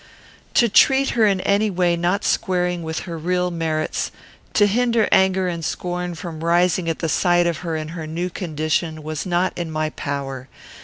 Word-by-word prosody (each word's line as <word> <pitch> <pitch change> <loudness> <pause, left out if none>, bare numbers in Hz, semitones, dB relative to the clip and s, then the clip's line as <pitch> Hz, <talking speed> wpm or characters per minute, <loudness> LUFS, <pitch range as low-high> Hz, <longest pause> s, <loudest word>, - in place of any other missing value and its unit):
To 235 - +5
treat 270 +5 +4
her 225 -3 +3
in 195 -2 +1
any 205 +3 +2
way 180 -2 +1
not 175 +4 0
squaring 180 -3 0
with 160 0 -4
her 170 -3 -6
real 180 +2 0
merits; 160 -2 -2 0.5
to 205 - +6
hinder 230 +1 +2
anger 190 -1 +3
and 170 -2 -3
scorn 180 +1 -3
from 160 -1 -7
rising 175 0 +2
at 165 - -1
the 165 - -2
sight 175 +2 +3
of 170 -2 0
her 165 -1 -4
in 155 0 -4
her 165 -1 -6
new 175 +3 -3
condition, 155 -2 -2
was 155 +2 -4
not 180 +1 +1
in 170 -2 -4
my 155 0 -2
power. 135 -2 -5
175 Hz, 185 wpm, -21 LUFS, 160-185 Hz, 0.5 s, to